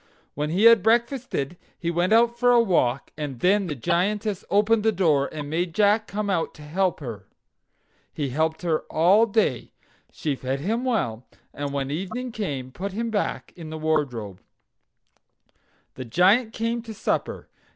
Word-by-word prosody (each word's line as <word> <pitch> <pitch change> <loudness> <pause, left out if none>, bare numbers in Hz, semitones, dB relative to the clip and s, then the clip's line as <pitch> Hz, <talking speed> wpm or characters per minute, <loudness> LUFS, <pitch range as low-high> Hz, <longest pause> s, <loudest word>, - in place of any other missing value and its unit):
When 150 +1 -2
he 180 +6 +1
had 230 -2 +8
breakfasted 230 - 0 0.2
he 170 -1 -2
went 175 +3 0
out 235 +1 +4
for 245 0 +4
a 240 - +6
walk, 140 - +1
and 145 -5 -5
then 195 - +2
the 150 - -3
Giantess 195 - -1
opened 210 +2 +3
the 220 +1 +3
door, 155 -8 +2
and 150 -2 -6
made 170 +2 -2
Jack 210 +1 +3
come 210 0 -3
out 180 -5 -1
to 150 - -12
help 180 +3 -1
her. 110 -8 -7 0.8
He 145 -3 -3
helped 160 +5 -1
her 165 -3 +1
all 190 +8 +4
day. 200 - 0 0.4
She 150 -3 -2
fed 130 +1 -3
him 220 - -1
well, 125 - -1 0.3
and 145 0 -4
when 140 -1 -2
evening 195 - -4
came 140 - -4
put 190 +7 -5
him 230 +2 -2
back 205 -2 -2
in 165 -3 -9
the 160 - -6
wardrobe. 135 -11 -2 1.5
The 130 - -7
Giant 195 - +3
came 230 +1 -2
in - - -9
to 220 -1 -8
supper. - - -2
180 Hz, 170 wpm, -24 LUFS, 145-215 Hz, 1.5 s, had